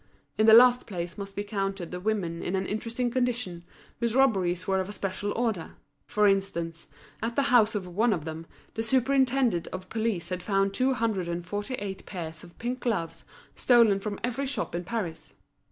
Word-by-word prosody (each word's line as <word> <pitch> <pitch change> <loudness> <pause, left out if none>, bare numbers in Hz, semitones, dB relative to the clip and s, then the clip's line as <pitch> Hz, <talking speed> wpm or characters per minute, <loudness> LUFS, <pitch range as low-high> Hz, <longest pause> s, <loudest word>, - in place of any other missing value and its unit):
In 215 - +3
the 220 - +9
last 245 +1 +7
place 175 -3 -5
must 200 -1 -7
be 205 - -2
counted 195 -4 -3
the 180 - -4
women 180 -5 -1
in 185 - -2
an 190 0 -1
interesting 230 +4 -2
condition, 240 -9 -1 0.4
whose 235 -1 0
robberies 185 -9 +2
were 190 0 +1
of 190 +1 -3
a - - -5
special 200 +1 -3
order. 225 -8 -2 0.3
For 210 -1 +3
instance, 170 -4 -1 0.3
at 230 +1 -2
the 280 -2 +1
house 225 -3 +5
of 200 -3 -2
one 210 +7 +1
of 165 -7 -1
them, 160 +1 -6 0.3
the 225 - -2
superintendent 255 -5 +2
of 185 0 -7
police 220 -6 -1
had 180 -1 -3
found 195 0 +1
two 260 +4 +2
hundred 220 -6 -1
and 170 0 -3
forty 205 +7 -3
eight 200 -4 -6
pairs 160 -4 -6
of 175 -1 -15
pink 245 +2 -3
gloves 200 -10 -2 0.3
stolen 230 -5 +5
from 205 0 -4
every 250 +3 -1
shop 275 - -2
in 175 +1 -2
Paris. 170 -7 -5
205 Hz, 190 wpm, -28 LUFS, 180-235 Hz, 0.4 s, the